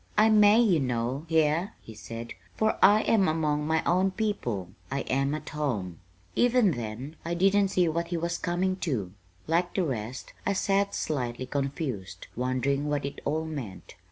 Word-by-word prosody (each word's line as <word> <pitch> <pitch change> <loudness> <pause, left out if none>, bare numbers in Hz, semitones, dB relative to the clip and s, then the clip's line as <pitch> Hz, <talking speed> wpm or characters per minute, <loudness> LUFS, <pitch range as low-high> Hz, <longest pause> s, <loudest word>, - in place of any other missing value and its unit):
"I 215 +1 +6
may, 210 +1 +6
you 200 -9 +4
know, 125 +3 -2
here," 160 +5 +2
he 110 - -12
said, 115 +2 -7 0.2
"for 220 0 +1
I 210 +2 +7
am 205 -4 +3
among 150 -2 0
my 160 0 +1
own 185 +2 +3
people. 155 - -2 0.2
I 140 +1 -1
am 140 +2 0
at 155 0 -7
home." 110 - -3 0.4
Even 245 -5 +4
then 120 +4 -6
I 170 +1 -2
didn't 195 +3 +4
see 185 -2 +2
what 170 +1 -1
he 175 0 -2
was 170 +1 -2
coming 185 +2 0
to. 120 - -2 0.3
Like 170 +3 0
the 190 - +2
rest 125 -2 -5
I 200 - +1
sat 200 +1 +1
slightly 130 -4 -2
confused, 135 - -4
wondering 130 +4 0
what 145 -2 -1
it 140 - -6
all 155 +2 0
meant. 135 -12 -7
155 Hz, 170 wpm, -28 LUFS, 130-185 Hz, 0.4 s, I